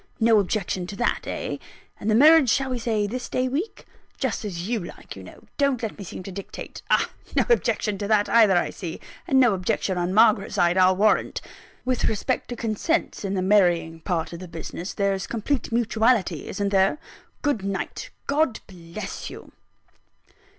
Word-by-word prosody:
No 225 -1 +5
objection 190 -2 -1
to 200 - -7
that 235 - -1
eh? - - -3 0.4
And 210 - -2
the 215 - +4
marriage, 300 +1 +7
shall 270 +2 +1
we 250 - -2
say 220 -3 0
this 250 +5 -5
day 255 0 0
week? 305 - -4 0.3
Just 260 -4 -2
as 180 -3 -4
you 235 0 0
like, - - -10
you - - -10
know - - -13 0.2
don't 275 -4 +1
let 220 - -3
me 205 - -8
seem 185 - -8
to 195 - -7
dictate. 195 +1 -8
Ah! - - +2 0.2
no - - +3
objection 210 - +1
to 205 - -3
that, 210 -1 +3
either, 215 -6 +5
I 175 - 0
see, 170 -5 -6 0.3
and 265 - +4
no 245 -5 +5
objection 190 -1 -1
on 175 +1 -1
Margaret's 215 -1 +4
side, 175 0 +3
I'll 185 0 +5
warrant! 210 +3 +2 0.5
With 255 -1 0
respect 225 +4 -1
to 245 - -4
consents, 235 +10 -1
in 195 0 -2
the 185 - 0
marrying 175 -5 +3
part 165 -1 -2
of 170 - -7
the 185 - -8
business, 170 +2 -7
there's 195 -2 0
complete 235 +4 -2
mutuality 225 - +1
isn't 200 0 -2
there? 195 +6 +3 0.5
Good 285 -9 0
night: 195 -1 -4 0.2
God 285 -4 +1
bless 185 +2 -7
you!" - - -11
210 Hz, 185 wpm, -24 LUFS, 185-240 Hz, 0.5 s, marriage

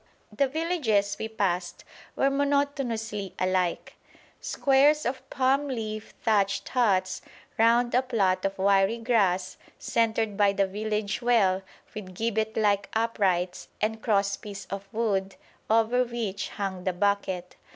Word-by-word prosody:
The 275 +5 +3
villages 260 - 0
we 220 - -2
passed 185 -5 -2 0.3
were 275 - +2
monotonously 275 -8 -1
alike: 185 -1 -1 0.4
squares 285 +2 +3
of 255 +2 -4
palm 270 +2 +1
leaf 215 -4 -5
thatched 200 -4 +1
huts 190 -7 +1 0.4
round 235 +2 +4
a 250 - +4
plot 195 -8 0
of 195 0 -2
wiry 195 +3 +3
grass 195 -6 +1 0.2
centred 225 -2 0
by 200 -1 +3
the 200 0 +2
village 210 +1 -2
well 210 -6 +3 0.3
with 185 -4 -8
gibbet 220 +1 -1
like 205 -2 +2
uprights 190 -6 0
and 220 +1 -1
cross 200 -3 +1
piece 200 -1 -8
of 195 0 -6
wood 195 -4 -1 0.3
over 225 +3 +3
which 225 -5 -4
hung 190 -3 -4
the 185 - 0
bucket. 190 -2 -1
215 Hz, 130 wpm, -27 LUFS, 195-235 Hz, 0.4 s, round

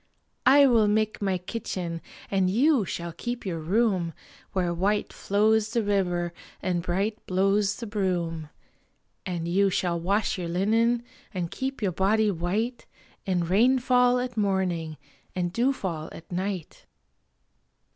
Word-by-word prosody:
I 280 +2 +8
will 230 -5 +4
make 215 +1 +1
my 195 -2 +1
kitchen, 180 -3 -4 0.3
and 190 -2 +2
you 255 +2 +3
shall 170 -1 -4
keep 240 +7 -5
your 170 -4 -2
room, 185 -1 +1 0.4
Where 180 -3 0
white 200 +4 0
flows 215 +2 +2
the 230 0 0
river 180 -4 0 0.3
and 180 -2 -1
bright 195 +5 -2
blows 195 +2 +2
the 235 - -6
broom, 175 -7 -2 0.8
And 170 -2 -3
you 195 +3 +3
shall 175 -2 0
wash 195 +3 0
your 175 - -3
linen 225 +6 +2 0.3
and 175 -2 -2
keep 265 -3 -4
your 195 - +2
body 205 +4 +2
white 205 +8 -2 0.4
In 180 -2 +1
rainfall 250 +6 +4
at 250 -1 -3
morning 185 -6 0 0.4
and 175 -1 -1
dewfall 195 - -1
at 165 - -12
night. 185 -1 -4
195 Hz, 135 wpm, -26 LUFS, 175-220 Hz, 0.8 s, I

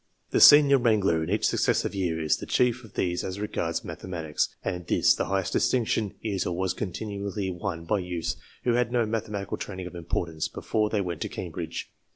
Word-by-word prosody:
The - - +2
senior 145 -2 +9
wrangler, 100 -9 +2
in 80 - -4
each 105 +3 +1
suc - - 0
cessive - - +1
year, 90 -5 -1
is 80 -1 +2
the - - -8
chief 125 0 +2
of 110 - -15
these 90 -1 0
as 95 +1 -4
regards 85 -5 -2
mathematics, 80 -5 -3 0.2
and 90 -2 -3
this, - - +4
the - - -1
highest 95 -2 -1
distinction, 110 -4 +1
is, 100 -5 -1
or 85 - -2
was, 95 0 0
continually 100 0 -4
won 90 -2 -4
by 105 +4 +1
youths 90 -2 -3 0.3
who 120 - +2
had 120 -1 +1
no 120 -2 +2
mathematical 105 -2 -3
training 95 -2 -6
of 90 - -8
importance 85 -2 -2
before 110 -1 -1
they 105 -2 0
went 85 -4 -4
to - - -2
Cambridge. - - -5
95 Hz, 195 wpm, -27 LUFS, 90-110 Hz, 0.3 s, senior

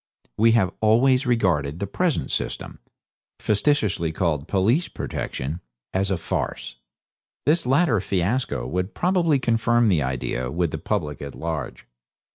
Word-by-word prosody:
We 115 +1 +4
have 105 -6 +3
always 125 +5 +4
regarded 85 - +1
the 100 - -2
present 165 - -1
system - - -3 0.6
facetiously 105 - +1
called 80 -3 -1
police 110 - +2
protection 75 +7 -4 0.3
as 95 +1 +1
a 95 - 0
farce. 70 -6 -4 0.7
This 160 0 +2
latter 135 - +3
fiasco 95 - -1
will 90 +8 -1
probably 170 - +1
confirm 120 -2 +2
the 85 -6 +3
idea 65 -1 -2
with 85 +2 -1
the - - -4
public 75 -2 -2
at 70 -1 -7
large. 80 -7 -5
100 Hz, 130 wpm, -24 LUFS, 80-125 Hz, 0.7 s, We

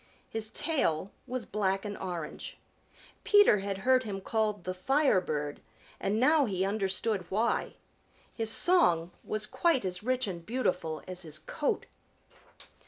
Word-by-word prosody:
His 220 -1 -1
tail 200 - 0 0.2
was 250 -3 -3
black 195 -1 0
and 205 -1 -4
orange. 175 -5 -6 0.7
Peter 410 - +6
had 195 0 -3
heard 260 0 +5
him 200 -4 -4
called 210 -1 -1
the 185 - -3
Firebird, 185 - +1 0.4
and 205 +3 0
now 295 +3 +5
he 190 -4 0
understood 195 -1 -1
why. 220 +4 0 0.6
His 225 -2 -2
song 200 - +3
was 215 0 -2
quite 285 - +1
as 180 -1 -2
rich 255 +3 +1
and 175 -4 -5
beautiful 180 -9 -1
as 185 -1 -6
his 155 -3 -5
coat. 285 - -2
205 Hz, 135 wpm, -30 LUFS, 185-250 Hz, 0.7 s, Peter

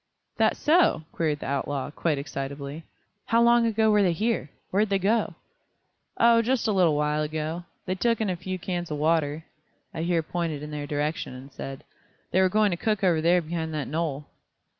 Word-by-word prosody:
"That - - +3
so?" 320 - +3
queried 150 -3 -1
the - - -5
outlaw, 140 0 -2
quite 155 -1 0
excitably. 140 +2 -5 0.4
"How 230 - +3
long 235 0 +5
ago 220 -1 +3
were 210 -1 +4
they 180 -3 +3
here? 215 - -1 0.2
Where'd 205 +2 +2
they 195 - +2
go?" 210 +4 +1 0.8
"Oh 230 0 +5
just 240 0 0
a - - +2
little 180 -6 +3
while 150 +1 +1
ago. 155 +3 -3 0.2
They 185 - -1
took 230 +4 +1
in 220 - 0
a 185 - 0
few 185 +2 -5
cans 175 -1 -4
of 150 - -3
water," 155 0 +1 0.5
I 160 - -4
here 170 -1 +1
pointed 160 -3 -3
in 150 - -7
their 145 -1 -4
direction, 150 -2 -2
and 135 +2 -11
said: 135 0 -7 0.5
"They 185 - +3
were 185 - +4
going 210 +1 +3
to 175 - -1
cook 210 +1 -1
over 170 -4 +3
there 175 +2 +3
behind 160 0 -3
that 150 -3 -2
knoll." 150 -2 -2
170 Hz, 195 wpm, -26 LUFS, 150-200 Hz, 0.8 s, long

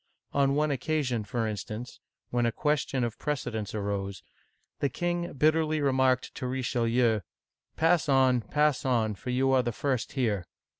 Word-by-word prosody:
On 140 -1 +3
one 150 0 +2
occasion, 135 -4 -1
for 115 +2 -2
instance, 110 +2 -5 0.3
when 120 -1 +2
a - - +1
question 140 -1 0
of 120 -1 -3
precedence 115 -8 -3
arose, 100 -2 -3 0.6
the 140 - +1
king 175 +4 -2
bitterly 155 +2 +2
remarked 130 -2 +2
to 130 - -4
Richelieu, 120 -3 +1 0.6
Pass 165 -1 +3
on, 130 -2 +4
pass 150 +5 +1
on, 115 -5 +1
for 115 +5 -8
you 130 +2 +2
are 130 -1 +5
the 120 -1 -2
first 130 +1 -2
here 110 -9 0
130 Hz, 150 wpm, -28 LUFS, 115-145 Hz, 0.6 s, are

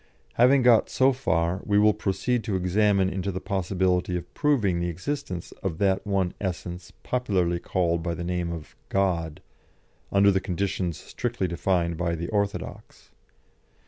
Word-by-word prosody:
Having 125 +2 +5
got 120 -3 +5
so 135 +1 +3
far, 90 -8 0
we 100 -1 +1
will 105 +1 +5
proceed 110 +4 -1
to 105 -4 -1
examine 95 +1 +2
into 95 +1 -2
the 95 - -4
possibility 95 -2 0
of 85 0 -9
proving 115 - +1
the 85 0 -1
existence 90 - -4
of 90 -5 -3
that 95 +1 +1
one 95 -3 0
essence 90 -1 -5
popularly 95 -9 0
called 85 -2 0
by 85 0 -2
the 85 - -5
name 90 -1 -2
of 80 -2 -8
God, 85 -5 0 0.7
under 100 0 +5
the 95 -1 +1
conditions 95 -2 -2
strictly 120 -6 -3
defined 85 -1 0
by 85 -1 -1
the 85 +1 -5
orthodox. 100 -2 -4
95 Hz, 150 wpm, -26 LUFS, 85-105 Hz, 0.7 s, Having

